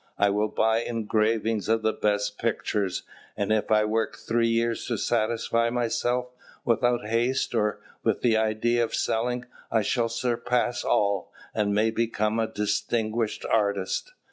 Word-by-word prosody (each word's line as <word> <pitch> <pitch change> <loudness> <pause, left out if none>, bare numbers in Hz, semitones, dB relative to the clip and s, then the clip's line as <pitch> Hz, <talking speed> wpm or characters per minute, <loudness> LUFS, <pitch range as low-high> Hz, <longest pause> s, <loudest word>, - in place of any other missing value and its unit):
I 100 0 +3
will 105 +2 +1
buy 110 +1 +2
engravings 110 -1 0
of 115 0 +2
the 110 0 +2
best 105 -1 0
pictures. 105 -4 -1 0.3
And 100 0 -1
if 110 - 0
I 105 0 +4
work 110 0 -1
three 115 0 +1
years 115 0 0
to 120 - -1
satisfy 115 +1 +1
myself, 120 +1 0 0.4
without 120 -1 +2
haste 120 +4 0
or 105 -2 +1 0.2
with - - +1
the 115 -2 +3
idea 110 +2 +2
of 115 - -2
selling, 125 +2 -1 0.3
I 110 -2 +2
shall 115 +2 +1
surpass 120 +1 0
all, 100 -3 +1 0.2
and 105 -2 +1
may 110 +2 +3
become 110 -1 0
a 110 0 -1
distinguished 110 +2 -1
artist." 100 - 0
110 Hz, 145 wpm, -26 LUFS, 105-115 Hz, 0.4 s, I